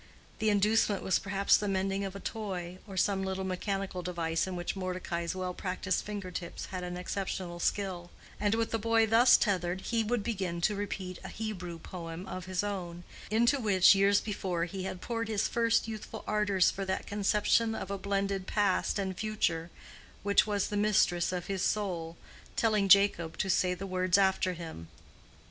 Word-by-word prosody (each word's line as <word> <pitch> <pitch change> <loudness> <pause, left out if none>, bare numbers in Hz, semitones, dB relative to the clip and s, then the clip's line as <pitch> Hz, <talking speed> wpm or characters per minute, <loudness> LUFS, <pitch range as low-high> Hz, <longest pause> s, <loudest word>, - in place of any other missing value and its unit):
The 220 - +2
inducement 210 0 +2
was 190 - +2
perhaps 200 0 +3
the 210 - 0
mending 195 0 0
of 195 0 -5
a - - -5
toy, 185 -4 -5
or 195 -2 -8
some 195 +1 +2
little 190 0 -2
mechanical 190 0 -3
device 170 -1 -1
in 185 - -4
which 175 +2 -3
Mordecai's 180 -2 -3
well 185 -1 -3
practiced 185 0 -2
finger 205 -3 -5
tips 170 -1 -5
had 180 -1 -3
an 180 0 -4
exceptional 180 -1 -4
skill; 180 -2 -1 0.3
and 210 +1 +2
with 225 0 -1
the 225 - 0
boy 225 +1 +3
thus 230 +3 +6
tethered, 185 -3 0
he 230 +1 0
would 225 0 -1
begin 190 -7 -2
to 210 - +2
repeat 190 -3 -4
a - - -6
Hebrew 185 -6 -5
poem 165 +1 -7
of 185 -2 -6
his 185 +1 -1
own, 175 -4 -4 0.3
into 235 +6 +3
which 200 -6 +6
years 200 +1 +4
before 185 -5 -2
he 190 +1 -5
had 185 -1 -5
poured 230 -1 -3
his 215 -1 0
first 230 -1 +2
youthful 220 0 -7
ardors 205 -3 +2
for 195 - -4
that 190 0 -2
conception 210 +2 +2
of 195 - -5
a 200 - -2
blended 195 -1 -1
past 205 -2 +1
and 190 -2 -2
future 175 -6 -1 0.5
which 200 +1 +4
was 205 -2 0
the 205 - -2
mistress 200 -5 +2
of 180 -2 -3
his 195 -2 -3
soul, 175 -6 -1 0.4
telling 215 -3 +2
Jacob 195 -5 +5
to 190 - +1
say 180 0 +2
the 195 - -6
words 185 -1 +2
after 190 -1 +2
him. 160 - -8
195 Hz, 180 wpm, -31 LUFS, 180-210 Hz, 0.5 s, thus